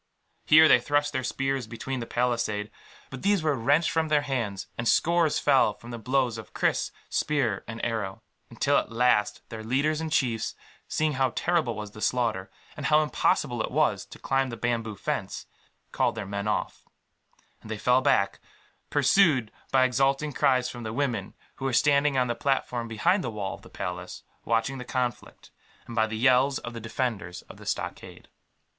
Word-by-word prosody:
Here 155 +1 +8
they 125 - +6
thrust 145 +3 0
their 130 -1 -1
spears 135 -1 -2
between 125 +3 -5
the 115 - -5
palisade; 115 -4 -1 0.4
but 130 - -7
these 200 -3 +2
were 155 -2 +2
wrenched 145 +7 +2
from 160 -1 +1
their 150 -1 +2
hands, 115 -9 -2
and 120 - -3
scores 170 +1 +3
fell 135 -7 +3
from 120 +3 -12
the 120 - -6
blows 125 -1 0
of 110 - -12
kris, - - +1 0.2
spear, 130 -10 0
and 115 0 -4
arrow; 110 -5 -3 0.3
until - - +1
at - - -6
last 115 -3 +2
their 110 -1 -7
leaders 145 +7 0
and 160 -1 -4
chiefs, 115 -7 0 0.3
seeing 155 -1 0
how 130 -1 +2
terrible 165 -9 +1
was 105 -1 -6
the 105 - -11
slaughter, 110 -7 0 0.3
and 145 -4 -3
how 155 0 +5
impossible 145 -4 0
it - - -2
was - - +1
to - - -12
climb 135 -1 0
the 115 - -6
bamboo 115 -3 -2
fence, 95 - -4 0.5
called 120 - +1
their 110 -3 -4
men 100 +1 -4
off; 105 - -2 0.8
and 110 - -12
they 110 - -3
fell 125 +4 +3
back, 100 -8 +2 0.5
pursued 145 - +3 0.2
by 130 -1 +5
exulting 135 +3 +1
cries 130 -3 +2
from 120 -1 -7
the 110 -1 -4
women, 120 -7 -2 0.2
who 135 - -5
were 135 - 0
standing 140 +2 +3
on 125 - +3
the 120 - -1
platform 125 -2 -1
behind 115 - +1
the 120 - -2
wall 105 -3 -4
of - - -11
the - - -15
palace, 90 0 -6 0.2
watching 115 +4 0
the - - -5
conflict, 125 -1 -4 0.3
and 115 - -8
by 110 -1 +3
the 110 0 -4
yells 130 +3 +4
of 120 - -7
the 115 - -7
defenders 110 -6 -3
of - - -14
the - - -12
stockade. - - -5
125 Hz, 185 wpm, -27 LUFS, 110-140 Hz, 0.8 s, Here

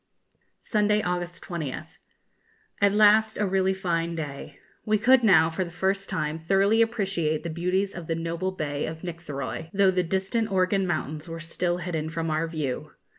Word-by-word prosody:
Sunday, 210 -1 +1
August 175 -1 -3
20th. 155 -4 -4 1.0
At 200 0 +5
last 215 +1 +5
a 210 - +1
really 190 0 +1
fine 170 -3 -1
day. 145 -2 -6 0.3
We 215 0 +2
could 245 +4 +5
now, 165 -6 +5
for 175 +3 -1
the 175 - -7
first 190 +3 -1
time, 155 +1 -2
thoroughly 195 +6 +3
appreciate 190 -9 0
the 170 - -4
beauties 180 +4 0
of 170 -3 -8
the 165 - 0
noble 170 +3 -2
bay 145 -5 -3
of 160 0 -7
Nictheroy, 165 -2 -5
though 195 -1 +5
the 185 -1 +1
distant 195 +5 -1
Organ 190 0 +2
mountains 155 -1 -3
were 165 0 -6
still 175 +1 -1
hidden 165 -3 -3
from 165 0 -2
our 155 +2 0
view. 150 -6 -4
175 Hz, 170 wpm, -26 LUFS, 160-195 Hz, 1.0 s, At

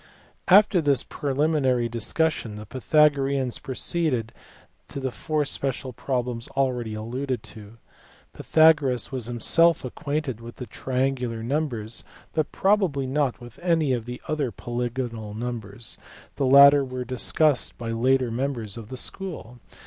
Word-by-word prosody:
After 200 -1 +6
this 145 -3 +2
preliminary 140 -4 0
discussion 115 +1 -1
the 105 0 -8
Pythagoreans 135 0 +2
pro 135 -3 -6
ceeded 135 -11 0 0.6
to - - -6
the 130 -1 -2
four 150 +4 -1
special 135 -2 -3
problems 125 -1 -3
already 125 -5 0
alluded 125 +2 -3
to. 110 +1 -12 0.6
Pytha 160 0 +5
goras 130 -6 -3
was 125 -4 -2
himself 165 +7 +3
acquainted 140 -2 -3
with 120 +1 -10
triangular 125 -3 -2
numbers, 120 -5 -2 0.3
but 155 -2 -1
probably 190 -9 +1
not 135 -1 0
with 120 -1 -12
any 165 -6 +1 0.3
other 150 -4 -1
polygonal 120 -3 -4
numbers: 115 -2 -4 0.4
the 135 - 0
latter 140 +1 +8
were 130 -1 -5
discussed 130 +3 +2
by 115 -1 -4
later 125 +1 +2
members 120 -4 -3
of 115 -2 -9
the 130 - -5
school. 125 - -3
130 Hz, 125 wpm, -25 LUFS, 120-145 Hz, 0.6 s, latter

